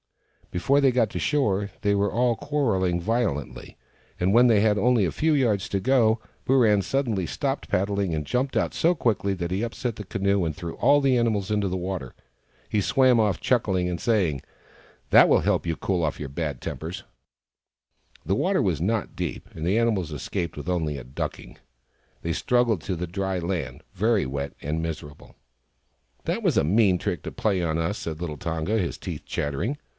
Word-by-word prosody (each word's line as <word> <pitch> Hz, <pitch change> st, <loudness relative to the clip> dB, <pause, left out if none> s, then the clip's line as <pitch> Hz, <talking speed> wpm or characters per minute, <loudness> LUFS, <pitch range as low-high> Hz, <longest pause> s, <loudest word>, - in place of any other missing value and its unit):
Before 140 Hz, +11 st, +2 dB
they 135 Hz, -2 st, +5 dB
got 120 Hz, -4 st, +1 dB
to -, -, -3 dB
shore, 105 Hz, -9 st, +1 dB
they 100 Hz, -, +2 dB
were 100 Hz, -1 st, +1 dB
all 120 Hz, +2 st, +2 dB
quarrelling 110 Hz, -12 st, 0 dB
violently, 105 Hz, -, -2 dB, 0.4 s
and 90 Hz, +2 st, +2 dB
when 120 Hz, +2 st, +6 dB
they 110 Hz, -4 st, +5 dB
had 105 Hz, 0 st, +3 dB
only 115 Hz, 0 st, +3 dB
a 85 Hz, -, -1 dB
few 160 Hz, 0 st, +1 dB
yards 115 Hz, -9 st, +1 dB
to 100 Hz, -, 0 dB
go 115 Hz, -1 st, +3 dB, 0.3 s
Booran 115 Hz, -7 st, +4 dB
suddenly 115 Hz, -9 st, -1 dB
stopped -, -, -3 dB
paddling, 100 Hz, -2 st, 0 dB
and 75 Hz, -1 st, -2 dB
jumped 130 Hz, -, -1 dB
out -, -, 0 dB
so 170 Hz, +2 st, +3 dB
quickly 105 Hz, -, 0 dB
that 85 Hz, -1 st, -4 dB
he 95 Hz, +2 st, -1 dB
upset 120 Hz, 0 st, -3 dB
the 105 Hz, -, -7 dB
canoe, 100 Hz, 0 st, 0 dB
and 80 Hz, -2 st, -1 dB
threw 85 Hz, -3 st, -6 dB
all 140 Hz, +4 st, +5 dB
the 135 Hz, -2 st, +3 dB
animals 110 Hz, -4 st, 0 dB
into 105 Hz, -2 st, +1 dB
the 95 Hz, -, -2 dB
water. 90 Hz, -8 st, -5 dB, 0.5 s
He 105 Hz, -, 0 dB
swam 130 Hz, +4 st, +4 dB
off, 105 Hz, -4 st, +2 dB
chuckling, 95 Hz, -8 st, +1 dB
and 90 Hz, -2 st, -3 dB
saying, 90 Hz, -, +1 dB, 0.3 s
" -, -, -28 dB
That -, -, +8 dB
will -, -, +5 dB
help -, -, +1 dB
to 85 Hz, -1 st, -2 dB
cool 85 Hz, -6 st, 0 dB
your 75 Hz, -, -6 dB
bad 70 Hz, -2 st, -3 dB
tempers! 90 Hz, +5 st, -5 dB, 0.6 s
" -, -, -34 dB
The 95 Hz, +5 st, +1 dB
water 185 Hz, -, +1 dB
was 85 Hz, -7 st, 0 dB
not 110 Hz, +3 st, -1 dB
deep, -, -, -4 dB
and 80 Hz, -, -5 dB
the 95 Hz, +5 st, +2 dB
animals 105 Hz, -8 st, +1 dB
escaped 85 Hz, +3 st, -4 dB
with 75 Hz, -, -7 dB
only 80 Hz, -5 st, -1 dB
a 65 Hz, -, -8 dB
ducking. 65 Hz, -, -6 dB, 0.6 s
They 85 Hz, -, -1 dB
struggled 120 Hz, -6 st, +1 dB
to 95 Hz, -, -3 dB
the 90 Hz, +2 st, -3 dB
dry 95 Hz, +1 st, -2 dB
land, 85 Hz, -8 st, -4 dB
very 105 Hz, +2 st, +2 dB
wet 70 Hz, +1 st, -4 dB
and 75 Hz, +3 st, -2 dB
miserable. 75 Hz, -3 st, -7 dB, 0.5 s
" -, -, -43 dB
That -, -, -1 dB
was -, -, +2 dB
a -, -, +4 dB
mean 95 Hz, +1 st, +4 dB
trick -, -, -3 dB
to -, -, -5 dB
play 100 Hz, -4 st, 0 dB
on 80 Hz, -1 st, 0 dB
us," 85 Hz, +6 st, -1 dB
said 80 Hz, -1 st, -5 dB
little 80 Hz, -4 st, -4 dB
Tonga, 85 Hz, +4 st, -1 dB
his 90 Hz, -, -2 dB
teeth -, -, -6 dB
chattering. 85 Hz, -, -2 dB
95 Hz, 195 wpm, -25 LUFS, 85-115 Hz, 0.6 s, That